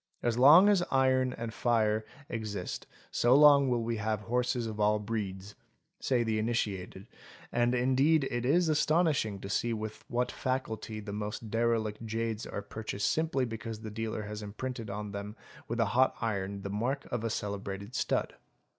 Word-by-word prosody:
" - - -37
As 120 -1 +1
long 150 +10 +8
as 205 -3 +4
iron 130 -1 +3
and 115 -1 -5
fire 110 -2 +1 0.2
exist 105 -5 -4 0.2
so 120 +2 +4
long 140 -2 +7
will 120 -2 +1
we 115 0 -2
have 105 0 -1
horses 125 +2 0
of 110 -1 -5
all 105 0 +3
breeds" 100 -2 -4 0.5
say 125 -3 +1
the 110 -1 0
initiated, 100 -4 -2 0.5
and 120 +1 +2
indeed 135 +4 +3
it 120 -1 -1
is 165 +7 +3
astonishing 155 - +2
to - - -6
see 115 +4 0
with 110 -1 -5
what 125 +1 -1
facility 115 -4 -3
the 100 -1 -7
most 105 +1 -5
derelict 115 -2 0
jades 115 0 -3
are 100 - -5
purchased 105 -2 -2
simply 155 -5 0
because 115 -1 -6
the 110 -1 -6
dealer 110 0 -3
has 105 +1 -6
imprinted 115 +2 -5
on 105 +1 -5
them 100 +1 -6 0.3
with 115 +1 -3
a 115 - +4
hot 130 +2 +4
iron 100 -3 -2
the 100 - -4
mark 125 +7 -1
of 120 -2 -2
a 115 - 0
celebrated 100 0 -4
stud. - - 0
115 Hz, 170 wpm, -30 LUFS, 105-125 Hz, 0.5 s, long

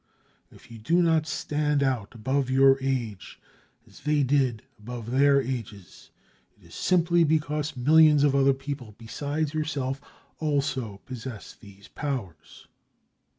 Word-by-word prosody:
If - - -18
you 115 - -10
do 165 +11 +1
not 160 -2 +2
stand 150 -2 -1
out 125 -6 -2
above 130 +4 -1
your 135 +1 +5
age, 120 -7 -3 0.5
as - - -17
they 150 -1 +1
did 130 -4 +1 0.2
above 115 +1 -7
their 140 +2 +4
ages, 115 -9 -6 0.5
it - - -22
is - - -16
simply 175 -1 +2
because 150 -2 -1
millions 150 +2 +5
of 145 -2 +3
other 135 0 +4
people 135 -6 -7
besides 145 +6 -3
yourself 140 -4 -2 0.4
also 135 -9 -2
possess 125 -3 -8
these 100 -2 -16
powers. 125 - -6
135 Hz, 130 wpm, -26 LUFS, 120-150 Hz, 0.5 s, your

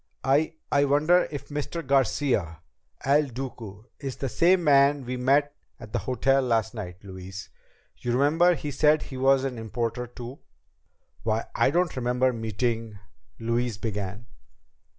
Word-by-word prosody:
"I 145 +5 +2 0.2
I 140 0 +4
wonder 155 +6 +3
if 145 - -7
Mr. 150 +2 -4
Garcia 125 - +1 0.4
El 145 +2 +4
Duque 115 -4 -8
is 135 -3 -5
the 135 - -3
same 175 - +3
man 140 -2 +4
we 125 +1 -3
met 140 +3 +2 0.2
at 105 - -11
the - - +1
hotel 135 +2 +2
last 115 -3 0
night, 90 -5 -7
Louise. 95 0 -9 0.5
You 120 - -2
remember 160 +7 +4
he 150 -2 -5
said 150 +2 +3
he 130 - -8
was 135 0 +4
an 130 -3 -3
importer 115 +2 -3
too." 120 +2 -9 0.8
"Why, 110 0 -1
I - - +3
don't 175 +3 +1
remember 125 0 +1
meeting 115 -1 -2 0.2
..." - - -39
Louise 115 -1 -1
began. 105 0 -4
130 Hz, 150 wpm, -26 LUFS, 115-145 Hz, 0.8 s, I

